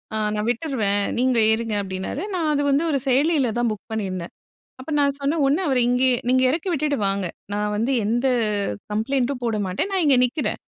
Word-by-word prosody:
அ - - 0 0.2
நான் 210 +1 -2
விட்டுருவேன். 225 -6 0 0.2
நீங்க 255 -1 +2
ஏறுங்க." 220 -1 -1
அப்படின்னாரு. 190 - -4
நான் 335 -4 0
அது 290 - +1
வந்து 280 +3 +2
ஒரு 280 - +1
செயலியில 275 -1 +2
தான் 240 -1 +1
புக் 215 +1 -8
பண்ணியிருந்தேன். 190 -5 -4 0.5
அப்ப 270 - -8
நான் 280 -1 +2
சொன்னேன், 290 +3 0
"ஒன்னு 295 +7 +2
அவர 265 -3 +1
இங்கயே 250 0 +3
நீங்க 255 0 +3
இறக்கி 325 +7 -1
விட்டுட்டு 295 -2 0
வாங்க. 195 -1 -1 0.3
நான் 210 0 -1
வந்து 230 +5 0
எந்த 240 +5 +1 0.6
கம்ப்ளைன்ட்டும் 250 +4 -1
போட 230 -2 0
மாட்டேன். 185 - -2
நான் 380 -2 +1
இங்க 275 -3 +5
நிற்கிறேன். 265 +5 -2
255 Hz, 185 wpm, -22 LUFS, 215-280 Hz, 0.6 s, இங்க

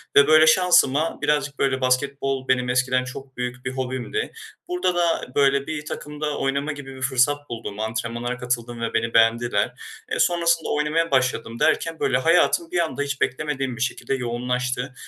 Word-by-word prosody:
Ve, 140 0 +7
böyle, 155 0 +6
şansıma, 160 -3 +4
birazcık, 150 -1 0
böyle, 135 -1 +1
basketbol 135 +1 0
benim 125 -1 +1
eskiden 130 0 +1
çok 130 0 -9
büyük 125 +1 -5
bir 125 - -2
hobimdi. 130 - -3 0.3
Burada 355 - 0
da, 170 -5 +1
böyle, 140 0 +3
bir 150 -1 -4
takımda 150 0 -4
oynama 140 +3 -1
gibi 135 -2 -9
bir 130 - -11
fırsat 140 +3 +1
buldum. 110 -3 -6
Antrenmanlara 115 +2 -3
katıldım 120 -1 -3
ve 115 - -2
beni 115 0 0
beğendiler. 115 -2 +2 0.4
E, - - -2
sonrasında 170 -1 +2
oynamaya 150 +2 0
başladım 130 -3 0
derken, 165 -1 +1
böyle, 125 -2 +2
hayatım 165 +2 +2
bir 175 - 0
anda 160 -4 -1
hiç 140 -1 -3
beklemediğim 135 -2 -1
bir - - -7
şekilde 130 +2 -2
yoğunlaştı. 125 +1 -2
135 Hz, 165 wpm, -23 LUFS, 125-150 Hz, 0.4 s, Ve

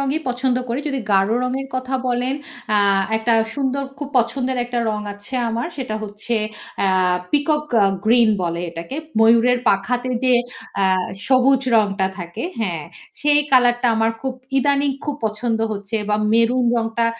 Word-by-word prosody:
রঙই 275 +3 0
পছন্দ 250 0 0
করি। 240 +4 -1
যদি 275 -2 -2
গাঢ় 195 +1 +3
রঙের 260 +2 -2
কথা 255 +1 -3
বলেন 250 +2 0 0.4
আ - - +4 0.4
একটা 225 +1 +1 0.2
সুন্দর 275 -1 -1 0.2
খুব 290 - -5
পছন্দের 250 +2 0
একটা 245 0 -3
রং 210 0 -3
আছে 205 +6 -8
আমার। 230 +4 -2
সেটা 255 -6 -4
হচ্ছে 210 +3 -4 0.5
আ - - +3 0.4
পিকক 300 +1 +1 0.2
আ - - +5 0.2
গ্রিন 230 +1 +5
বলে 170 -1 -2
এটাকে। 170 +10 -7 0.2
ময়ূরের 230 +2 +5
পাখাতে 245 +6 0
যে 255 - +4 0.5
আ - - +4 0.4
সবুজ 265 0 +4
রংটা 200 -3 +2
থাকে। 175 +5 -6 0.2
হ্যাঁ। 170 -8 -2 0.4
সেই 295 0 +4
কালারটা 245 -1 +4
আমার 225 0 +2
খুব 265 -1 -2 0.3
ইদানিং 280 +1 +2
খুব 295 - -2
পছন্দ 225 +1 -1
হচ্ছে 205 +1 -4
বা 210 - +2 0.2
মেরুন 230 +2 +3
রংটা 230 0 0
240 Hz, 155 wpm, -20 LUFS, 215-265 Hz, 0.5 s, আ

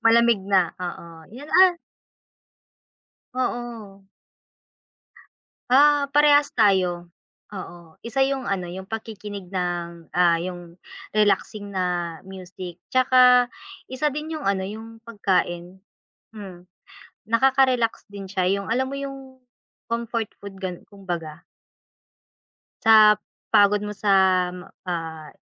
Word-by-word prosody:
Malamig 230 -1 +5
na. 185 -4 +2
Oo, 170 -2 -8
yun, 280 +5 -10
ah 370 -2 +5 1.6
Oo. 230 -6 -5 1.6
Ah, 285 +2 +5
parehas 290 0 +4
tayo. 180 -5 +2 0.4
Oo, 175 -4 -10
isa 265 +4 0
yung 270 -3 -2
ano, 190 -2 -1
yung 190 +2 -8
pakikinig 210 -4 -7
ng, 175 -2 -4
ah, 170 -2 +4
yung 175 -1 -8 0.3
relaxing 210 0 +1
na 180 -3 -2
music, 185 -2 -10
tsaka 250 -1 +5 0.4
isa 260 +4 -1
din 300 +3 -5
yung 310 -2 -6
ano, 190 -1 -1
yung 220 +3 -9
pagkain. 185 -4 -1 0.6
Hmm, 185 -3 -11 0.5
nakaka-relax 255 +1 +2
din 200 -1 -8
siya 185 -1 0
yung 200 0 -2
alam 260 +4 -1
mo 275 - -4
yung 270 -1 -8 0.5
comfort 230 -1 -2 0.2
food 195 -1 -9
gan 185 -2 -6
kumbaga. 170 -5 -6 1.4
Sa 215 -1 +7 0.3
pagod 205 0 +4
mo 210 - -4
sa, 200 0 0 0.7
ah, 160 -3 -5
200 Hz, 105 wpm, -23 LUFS, 180-240 Hz, 1.6 s, Sa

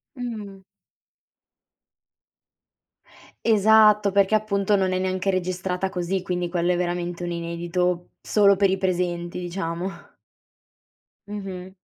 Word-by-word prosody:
Mh. 215 -6 -6 2.9
Esatto, 215 -1 +5
perché 200 +1 +3
appunto 210 -1 +2
non 190 -2 +1
è 185 - 0
neanche 185 +1 -1
registrata 185 0 -1
così, 185 0 -2
quindi, 180 -1 -2
quello 175 0 0
è - - +2
veramente 175 0 -2
un 175 - -3
inedito, 175 +1 -2
solo 200 -2 +4
per 195 0 +3
i 190 - +1
presenti, 175 -2 -1
diciamo. 175 0 -3 1.4
Mh-mh. 190 -3 -7
185 Hz, 105 wpm, -24 LUFS, 175-200 Hz, 2.9 s, Esatto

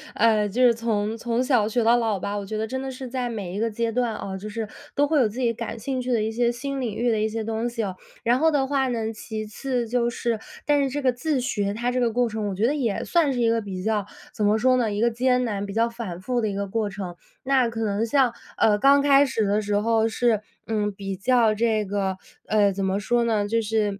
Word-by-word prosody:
呃， 215 -2 +3
就 245 +6 +1
是 245 -1 +6
从 220 -2 -1
从 235 +1 -1
小 250 -5 +2
学 235 +2 0
到 235 +2 +5
老 225 -4 0
吧， 200 +3 -3
我 205 - -3
觉 215 +2 -4
得 220 - -1
真 260 +3 -3
的 270 - -4
是 260 0 -7
在 250 0 -2
每 200 -6 -5
一 200 - -3
个 230 +1 +1
阶 230 +1 -1
段 240 -1 0
啊， 195 -2 -5
就 200 +3 -6
是 220 0 -4 0.3
都 290 - +4
会 305 0 +2
有 230 - +3
自 225 +5 -7
己 235 -2 +1
感 230 - -5
兴 260 +3 -2
趣 250 - -3
的 235 -3 +2
一 220 +1 -1
些 235 +1 +1
新 275 +3 -4
领 225 -5 -3
域 240 +1 +1
的 220 - +1
一 215 - +1
些 225 0 -3
东 225 +2 -2
西 235 -1 -3
哦。 190 -3 -3 0.3
然 240 +2 +3
后 320 +2 +4
的 280 -2 +2
话 270 -1 +1
呢， 225 -3 -2
其 215 0 -6
次 245 +2 -3
就 240 +1 +1
是， 235 -1 -2 0.3
但 290 -1 +3
是 275 - 0
这 290 +2 -3
个 255 -2 +2
自 270 +3 -1
学 205 -5 -1
它 240 +2 -1
这 255 - 0
个 240 -2 +2
过 245 +2 +1
程， 220 -2 -3
我 195 - -4
觉 205 +4 +1
得 265 - +2
也 235 -8 -1
算 330 -5 +2
是 250 - -2
一 235 - +3
个 230 0 +1
比 190 -3 -6
较 210 -1 0 0.3
怎 215 - -2
么 210 +1 +4
说 255 +3 +3
呢， 230 -4 +1
一 205 - -2
个 235 +2 +3
艰 250 +1 +2
难 205 -3 -2
比 200 - -6
较 230 +2 +2
反 230 -7 -6
复 245 +5 -1
的 220 - 0
一 200 - -4
个 200 0 -2
过 215 +1 -1
程。 190 -3 -6 0.3
那 260 -3 +3
可 225 -1 -3
能 205 +1 0
像， 250 0 +2 0.2
呃， 210 -1 +4
刚 275 +4 +6
开 280 0 +5
始 230 -5 0
的 205 +2 +1
时 205 0 -1
候 225 +1 +2
是， 225 -1 +1 0.2
嗯， 210 -2 -1
比 195 -1 -5
较 230 +2 +3
这 215 -1 +1
个， 195 -1 -2 0.3
呃， 205 -2 +3
怎 195 +1 -3
么 190 +1 0
说 240 +3 +1
呢， 215 -3 +1
就 225 +2 +1
是， 210 -2 -1
225 Hz, 290 characters per minute, -24 LUFS, 210-245 Hz, 0.3 s, 是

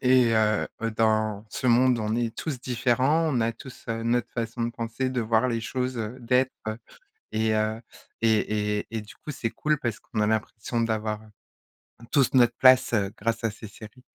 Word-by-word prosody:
et, 125 -2 +5
heu 110 -1 +2
heu 115 0 -1
dans 110 -1 +1
ce - - -3
monde 125 +1 +4
on 110 0 -1
est 115 -1 -1
tous 145 -6 -4
différents. 130 +6 +2
On 120 - +2
a 115 - +2
tous 125 +3 -12
notre 115 +1 0
façon 115 0 -3
de 115 - 0
penser, 120 +3 -3
de 130 -1 -1
voir 115 +2 +2
les 115 -2 -1
choses, 125 +2 -3 0.2
d'être, 125 +2 +2 0.2
heu, 110 +1 -4 0.5
et 110 0 +1
heu 110 +1 0 0.4
et 105 -2 +1
et - - -8
et 115 - -3
du 105 - -13
coup 150 - -8
c'est 115 -4 -3
cool, 150 +4 0
parce 120 -6 -3
qu'on 110 - -4
a 105 - +3
l'impression 110 +1 -1
d'avoir 110 -2 -1 0.9
tous 135 -3 +3
notre 120 -2 +5
place, 130 -1 +6
heu, 100 -3 +1
grâce 115 +2 -2
à 115 - +2
ces 110 0 -10
séries. 110 +4 -13
115 Hz, 190 wpm, -26 LUFS, 110-125 Hz, 0.9 s, place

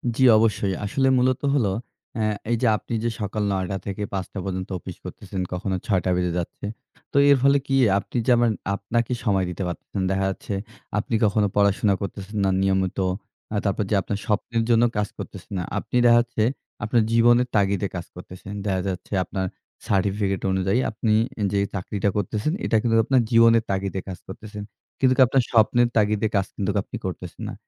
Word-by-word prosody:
জি, 130 - +2
অবশ্যই। 105 -3 +1
আসলে 135 +6 +1
মূলত 125 0 +2
হলো 115 -9 +2 0.4
অ্যা 110 -1 0 0.3
এইযে 120 +1 +2
আপনি 115 - -8
যে 120 - +1
সকাল 105 +1 -2
৯ 95 -1 0
টা 95 - -1
থেকে 100 +1 -3
৫ 95 -2 -2
টা 100 - -4
পর্যন্ত 95 -1 -4
অফিস - - -9
করতেছেন, 95 -2 -6
কখনো 95 +1 -2
৬ 95 -4 +2
টা 90 - +2
বেজে 90 -1 0
যাচ্ছে। 85 +3 -5 0.5
তো - - -1
এর 140 - +7
ফলে 140 +1 +5
কি 135 - +1 0.2
আপনি 125 - -6
যেমন 120 -2 +4 0.2
আপনাকে 115 +4 -1
সময় 95 -4 +2
দিতে 90 +2 -4
পারতেছেন। 90 +3 -5
দেখা 95 0 +1
যাচ্ছে, 95 +1 -5 0.4
আপনি 110 +2 -1
কখনো 105 0 +2
পড়াশোনা 100 0 +3
করতেছেন 100 +1 -6
না 95 - +3
নিয়মিত। 95 -1 +1 0.5
আ - - -1
তারপর 100 +1 +1
যে - - +4
আপনার 100 +2 -3
স্বপ্নের 115 +2 0
জন্য 115 0 +5
কাজ 105 0 +1
করতেছে - - -9
না। 90 - -1
আপনি - - -5
দেখা 120 0 +7
যাচ্ছে 120 -2 -2 0.4
আপনার 115 +3 +2
জীবনের 120 +1 +5
তাগিদে 100 -1 +2
কাজ 90 -1 -4
করতেছেন। 90 +2 -9
দেখা 95 -2 0
যাচ্ছে 95 +2 -5
আপনার 95 0 -3 0.4
সার্টিফিকেট 100 0 0
অনুযায়ী 95 +4 +1
আপনি 110 0 0 0.3
এ - - +1
যে 100 - +2 0.2
চাকরিটা 100 +1 -1
করতেছেন, 105 - -1
এটা 110 - +2
কিন্তু 115 0 +1
আপনার 130 -2 +3
জীবনের 115 -1 +6
তাগিদে 95 0 -2
কাজ 95 -2 -5
করতেছেন। 105 +2 -8 0.4
কিন্তুক 130 -1 +3
আপনার 130 +1 +2
স্বপ্নের 120 +1 +4
তাগিদে 105 0 +2
কাজ 95 - +2
কিন্তুক 100 +1 -1
আপনি - - -9
করতেছেন 90 -2 -6
না। - - -6
105 Hz, 180 wpm, -24 LUFS, 95-115 Hz, 0.5 s, এর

